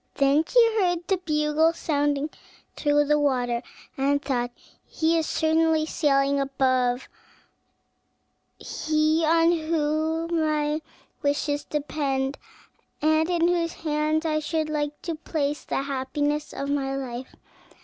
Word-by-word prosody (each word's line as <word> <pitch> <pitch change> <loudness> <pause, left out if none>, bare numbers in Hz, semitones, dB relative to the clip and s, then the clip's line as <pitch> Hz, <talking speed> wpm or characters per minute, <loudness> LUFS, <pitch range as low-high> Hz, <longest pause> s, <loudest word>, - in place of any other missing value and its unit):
Then 280 +2 +3
she 460 -2 +4
heard 350 -2 0
the 385 - +2
bugle 310 -1 +1
sounding 290 -2 0 0.4
through 295 0 +2
the 300 +1 +3
water, 245 -4 +1 0.3
and 280 +1 +1
thought 245 -4 -1 0.4
"He 325 +1 +1
is 325 -2 +1
certainly 320 0 +2
sailing 280 -3 +2
above, 255 -2 +1 1.5
he 310 +1 0
on 330 +1 +4
whom 320 +1 0
my 305 0 0 0.4
wishes 290 0 0
depend, 280 -2 -2 0.6
and 315 +2 +2
in 340 -1 +2
whose 340 -1 0
hands 310 0 -1
I 310 -1 +1
should 310 0 -2
like 295 -1 -2
to 335 - -2
place 300 -2 -2
the 270 - -1
happiness 290 +2 -2
of 275 - -4
my 270 -1 -1
life. 255 -1 -6
300 Hz, 120 wpm, -25 LUFS, 280-320 Hz, 1.5 s, she